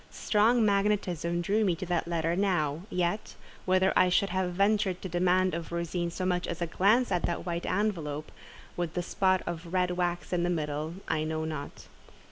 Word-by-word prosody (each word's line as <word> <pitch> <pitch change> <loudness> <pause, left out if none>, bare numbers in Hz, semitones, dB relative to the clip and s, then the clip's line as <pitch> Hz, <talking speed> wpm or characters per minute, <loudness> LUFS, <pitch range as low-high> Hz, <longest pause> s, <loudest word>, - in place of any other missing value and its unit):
Strong 225 +2 +2
magnetism 195 -5 +1
drew 205 +5 +1
me 185 -5 +2
to 185 - -5
that 175 -1 -1
letter 165 0 0
now; 170 -6 0
yet, 180 +4 -2 0.3
whether 185 +1 +3
I 185 - +5
should 195 +2 +2
have 185 -1 -1
ventured 200 -1 +2
to 190 - -4
demand 180 +1 +2
of 165 0 -5
Rosine 170 0 -2
so 185 +2 -4
much 180 -1 0
as 170 - -4
a 170 - 0
glance 205 +8 +2
at 180 -2 +1
that 170 - -3
white 170 -1 -3
envelope, 165 -8 -2 0.4
with 175 -2 -3
the 180 - -1
spot 185 0 +1
of 170 0 -5
red 180 -1 +2
wax 175 0 -2
in 175 - +1
the 175 - +1
middle, 155 -1 -2
I 155 - 0
know 160 0 -2
not. 155 -3 -6
180 Hz, 190 wpm, -29 LUFS, 170-190 Hz, 0.4 s, I